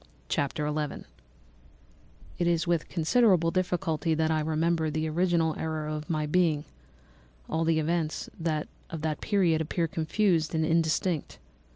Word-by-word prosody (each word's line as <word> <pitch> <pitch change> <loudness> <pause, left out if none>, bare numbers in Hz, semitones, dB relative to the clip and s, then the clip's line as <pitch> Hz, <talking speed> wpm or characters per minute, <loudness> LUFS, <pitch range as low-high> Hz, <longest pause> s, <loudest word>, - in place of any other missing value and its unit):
Chapter 145 +2 -1
11 150 -1 -3 1.3
"It 175 - +2
is 170 0 +2
with 170 -2 0
considerable 180 -1 +3
difficulty 175 -3 0
that 160 0 +1
I 155 - +2
remember 160 +1 +1
the 155 +1 -1
original 165 0 +1
era 155 -1 -2
of 150 0 -6
my 155 -2 0
being; 155 -2 +2 0.8
all 165 - 0
the 165 -1 +2
events 160 0 -1 0.6
of 165 -2 -5
that 155 -2 -2
period 180 -6 +2
appear 165 +2 -1
confused 165 0 +1
and 160 0 +2
indistinct. 165 0 0
160 Hz, 135 wpm, -28 LUFS, 155-170 Hz, 1.3 s, considerable